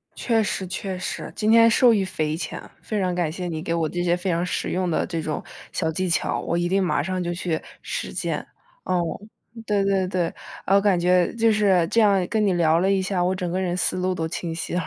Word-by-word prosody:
确 230 -2 +1
实 205 -2 -2
确 185 +1 -4
实。 180 - -5
今 215 0 +1
天 230 0 +7
受 235 +1 +5
益 200 -3 +1
匪 155 -4 -2
浅。 - - -5 0.2
非 215 - -3
常 185 -2 0
感 175 -3 0
谢 180 +2 -5
你 160 -2 -4
给 165 0 -2
我 165 -2 0
这 175 +2 -2
些 175 0 +2
非 180 +2 -3
常 170 0 0
实 - - -2
用 185 0 -1
的 - - +1
这 165 -3 -3
种 155 -1 -3 0.3
小 160 - -1
技 185 +3 -2
巧， 170 - 0
我 170 - -1
一 175 0 0
定 195 +1 +2
马 180 - +1
上 185 +3 -2
就 175 0 -2
去 170 -2 -2 0.2
实 - - -4
践。 - - -3 0.4
哦。 180 -1 0 0.6
对 205 -2 +2
对 195 -1 +1
对。 180 -2 -1 0.3
我 195 +1 +4
感 195 -3 +3
觉 180 0 +3
就 230 -1 +3
是， 195 -5 +3
这 230 - +4
样 200 -4 +4
跟 220 +1 0
你 195 - +2
聊 165 -2 +3
了 190 +2 +2
一 195 - +2
下， 185 -1 0
我 185 +1 +1
整 180 -1 -3
个 185 +2 -1
人 180 -1 -1
思 185 - 0
路 185 0 0
都 160 -2 -2
清 165 0 -4
晰 165 - -5
了。 180 - +1
180 Hz, 260 characters per minute, -24 LUFS, 170-195 Hz, 0.6 s, 天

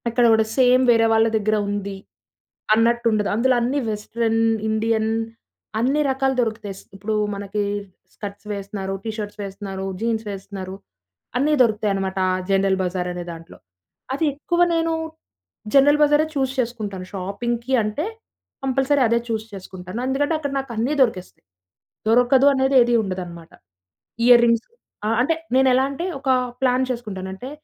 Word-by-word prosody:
అక్కడ 240 +1 +2
గూడా 220 0 +3
సేమ్ 255 0 +5
వేరే 230 -1 +4
వాళ్ళ 225 0 +4
దగ్గర 215 0 +1
ఉంది 200 -1 -3 0.8
అన్నట్టు 235 +2 +2
ఉండదు. 210 -1 +1
అందులో 255 +4 +3
అన్నీ 255 +5 0
వెస్టర్న్, 225 +2 -1 0.3
ఇండియన్ 220 0 +1 0.7
అన్ని 270 +6 +2
రకాలు 265 0 +1
దొరుకుతాయి. 220 -4 -2
స్ - - -16
ఇప్పుడు 210 +3 -3 0.2
మనకి 200 +1 -3 0.5
స్కర్ట్స్ 205 0 -8
వేస్తున్నారు, 195 -1 -5
టీ 225 - -3
షర్ట్స్ 210 0 -6
వేస్తున్నారు, 195 -1 -6 0.2
జీన్స్ 225 -1 -1
వేస్తున్నారు 190 -1 -7 0.6
అన్నీ 290 +4 +2
దొరుకుతాయనమాట. 200 -4 +1
ఆ - - +1 0.2
జనరల్ 195 0 +2
బజార్ 180 0 -2
అనే 175 0 -5
దాంట్లో. 165 0 -11 0.6
అది 280 +4 0
ఎక్కువ 345 +5 -1
నేను 330 0 +1 0.8
జనరల్ 290 +2 +6
బజారే 295 +1 +4
చూజ్ 265 -1 0
చేసుకుంటాను. 215 -6 -3
షాపింగ్‌కి 235 +6 -3
అంటే 215 +10 -2 0.6
కంపల్సరీ 270 +2 +2
అదే 235 +1 +2
చూజ్ 220 -2 -2
చేసుకుంటాను. 185 +1 -8
ఎందుకంటే 285 +4 0
అక్కడ 285 -2 -3
నాకు 270 -2 -6
అన్నీ 240 +7 0
దొరికేస్తాయి. 195 - -1 0.6
దొరకదు 245 +4 +5
అనేది 265 0 +1
ఏది 240 0 +2
ఉండదనమాట. 175 -4 -6 0.8
ఇయర్ 240 -1 +8
రింగ్స్ 230 -1 +2 0.4
ఆహ్, 225 +1 +1
అంటే 320 +6 +2 0.2
నేనేలా 260 0 +4
అంటే 330 +6 -4
ఒక 270 -1 -3 0.3
ప్లాన్ 255 0 +2
చేసుకుంటాను. 210 -6 -5
అంటే 250 +7 -8
225 Hz, 140 wpm, -22 LUFS, 200-260 Hz, 0.8 s, ఇయర్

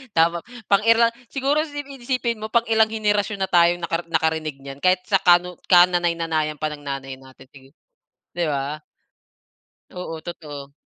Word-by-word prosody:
Tama 170 +1 +3 0.3
pang 200 +1 +4
ira 230 0 +5 0.2
siguro 275 +2 0
sipin 290 -3 -8
isipin 240 -2 -1
mo 215 - -5
pang 230 +1 +2
ilang 220 -1 +4
henerasyon 210 -2 -1
na 190 - 0
tayong 175 0 +4
naka 170 0 -2
nakarinig 160 -2 -1
niyan 135 0 -9
kahit 185 +3 +2
sa 195 - +2
kanuno 175 0 +3
kananay 175 -1 +5
nanayan 160 -2 -1
pa 155 - 0
ng 145 -1 -10
nanay 135 -1 -5
natin 130 0 -17 0.9
di 175 - 0
ba? 145 0 -2 1.1
Oo, 165 -3 -7
totoo. 145 -5 -8
175 Hz, 155 wpm, -22 LUFS, 155-215 Hz, 1.1 s, ira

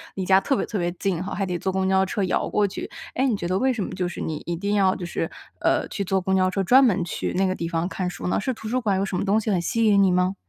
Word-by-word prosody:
离 190 - -3
家 190 +1 +5
特 275 - +1
别 - - -1
特 210 - -3
别 175 0 0
近 185 -1 -2
哈， 200 - -5
还 195 - -1
得 180 -2 -3
坐 190 - -1
公 190 0 0
交 190 0 +3
车 195 +1 -2
摇 185 - 0
过 210 - +2
去。 - - -6 0.2
诶， 265 +2 +1
你 240 - +1
觉 175 - -4
得 185 +2 0
为 265 0 +2
什 225 -5 -2
么 - - -5
就 180 -1 -2
是 175 - -7
你 155 -2 -3
一 170 - -2
定 200 +4 -2
要 190 -2 +3
就 180 - -5
是， 170 -1 -3 0.3
呃， - - +1
去 200 - -3
坐 190 +1 +1
公 190 +1 0
交 185 -1 +3
车 195 +1 -1
专 255 +8 +6
门 205 -8 +3
去 170 - -3
那 190 +1 +2
个 185 - +1
地 170 - -4
方 165 +1 -1
看 185 -2 -3
书 - - -6
呢？ - - +1
是 260 +5 -1
图 220 - -8
书 255 +3 0
馆 200 -4 +1
有 195 - 0
什 190 - -4
么 - - 0
东 205 +2 +3
西 215 -1 -2
很 180 - +1
吸 230 +6 0
引 200 -2 +5
你 190 - +4
吗？ 180 +1 +1
190 Hz, 355 characters per minute, -24 LUFS, 180-205 Hz, 0.3 s, 专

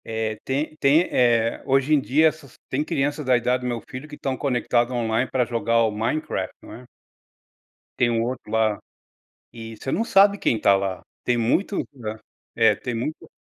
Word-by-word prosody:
É, 110 -1 -3
tem 145 +4 -2
tem, 145 +3 +4
eh 115 -2 +2
hoje 135 +3 +2
em 145 - +4
dia, 155 +5 +3
essas 155 -4 -5
tem 140 +3 0
crianças 145 +1 -1
da 130 -2 +3
idade 125 +2 0
do 125 - -3
meu 120 -2 -2
filho 130 +3 -8
que 150 - -9
estão 135 -3 -3
conectadas 125 -2 0
online 120 0 0
para 125 -2 +1
jogar 115 0 +1
o 110 - +1
Minecraft, 115 +9 -2
não - - -11
é. 125 - -11 1.1
Tem 120 - +3
um 115 -1 +1
outro 120 -3 -5
lá, 110 -2 +1 0.7
e 115 -1 -8
você 135 - -5
não 225 - +1
sabe 200 -2 +5
quem 115 - +1
está 100 -2 +4
lá. 95 -1 -2 0.2
Tem 125 - +1
muitos 145 - 0 0.2
hã, 110 0 -4 0.4
é, 110 -2 +4
tem 120 +4 -5
muito 125 +7 -5
125 Hz, 190 wpm, -23 LUFS, 115-140 Hz, 1.1 s, sabe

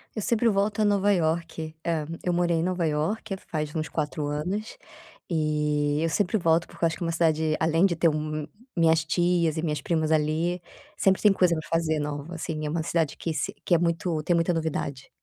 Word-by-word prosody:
Eu 215 - -2
sempre 230 +3 +2
volto 205 +2 0
a - - +4
Nova 205 0 +3
Iorque 160 -2 -1
ah, 160 -3 0 0.2
eu 180 - 0
morei 175 -1 +2
em 160 - 0
Nova 180 -1 0
Iorque 175 +7 -2
faz 155 -5 -4
uns 155 0 -1
4 150 -1 -2
anos, 180 - -3 0.5
eh, 150 -1 +1
eu 165 - +1
sempre 200 +6 +1
volto 165 -2 +2
porque - - -11
eu - - +6
acho 165 - -3
que - - -5
uma 165 - 0
cidade 160 -2 +2
além 165 +3 +3
de 180 -3 +2
ter, 165 +1 +3
hum, 155 0 -3 0.3
minhas 160 -2 +4
tias 170 -1 +1
e - - 0
minhas 150 -3 -1
primas 160 0 0
ali, 160 +3 +1 0.4
sempre 190 -1 +3
tem 210 - +6
coisa 180 -3 +3
pra 155 -1 -6
fazer 160 -2 +1
nova 145 +3 -4
assim, 155 -2 -4
é - - -2
uma 160 0 -1
cidade 165 -3 0
que 165 - -3
se - - -2
que 175 - +4
é - - +5
muito 170 -1 0
tem 175 +2 +2
muita 170 +1 +2
novidade. 145 -4 -3
165 Hz, 215 wpm, -26 LUFS, 155-175 Hz, 0.5 s, eu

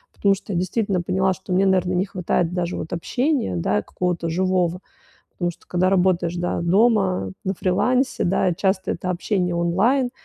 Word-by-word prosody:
потому 200 -1 +3
что 200 - -7
я 170 - 0
действительно 190 0 -1
поняла, 190 +2 +1
что 185 +1 -10
мне, 190 +2 +3
наверно, 185 -1 +2
не 180 +2 +1
хватает 180 -2 -1
даже 180 -1 -2
вот 160 - -5
общения, 250 - -1
да, 105 +5 0
какого-то 175 - -2
живого. 180 0 0 0.5
Потому 175 -1 -2
что - - -21
когда 180 +1 +1
работаешь, 180 -2 +2
да, 175 -1 -2
дома, 190 - +2
на 190 - -1
фрилансе, 250 +10 +1
да, 185 0 +1
часто 190 +2 0
это 185 - -4
общение 180 -1 -1
онлайн, 225 +10 +2
185 Hz, 170 wpm, -22 LUFS, 175-195 Hz, 0.5 s, потому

